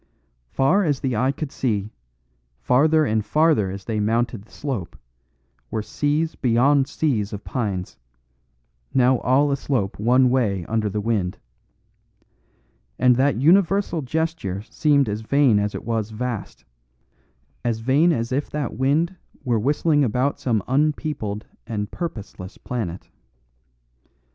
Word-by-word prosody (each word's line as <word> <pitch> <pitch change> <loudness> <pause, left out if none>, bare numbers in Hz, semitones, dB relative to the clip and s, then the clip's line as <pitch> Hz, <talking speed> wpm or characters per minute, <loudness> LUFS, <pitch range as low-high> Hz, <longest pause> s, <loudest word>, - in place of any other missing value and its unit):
Far 160 - +2
as 145 -6 0
the 130 -3 -1
eye 130 +5 +2
could 140 0 -5
see, 110 -7 -2 0.7
farther 155 - +3
and 110 -4 0
farther 150 -5 +2
as 95 0 -7
they 110 -2 -2
mounted 115 +1 0
the - - -25
slope, 130 - -5 0.7
were 110 -1 -2
seas 145 +8 -1
beyond 130 +3 +3
seas 120 -10 -1
of 105 - -6
pines, 100 - -3 1.0
now 130 -1 +4
all 140 +3 +2
aslope 130 -9 -1
one 125 +3 +4
way 100 -9 0
under 110 -1 -1
the 105 +1 -2
wind. 100 -5 -1 1.6
And 125 -1 +4
that 140 +1 +3
universal 175 - +3
gesture 150 - -2
seemed 140 +2 +2
as 105 +1 -3
vain 130 -2 +3
as 105 0 -2
it - - -6
was 110 -2 -1
vast, 115 0 -5 1.0
as 115 -2 -1
vain 140 +8 +3
as 115 -5 -2
if 140 +3 -1
that 145 -4 -3
wind 150 - +1 0.3
were 120 -3 +1
whistling 145 +4 +2
about 130 +4 0
some 110 -6 0
unpeopled 140 -6 -1 0.2
and 105 -2 -3
purposeless 105 - -7
planet. 100 -8 -5
125 Hz, 130 wpm, -23 LUFS, 105-145 Hz, 1.6 s, now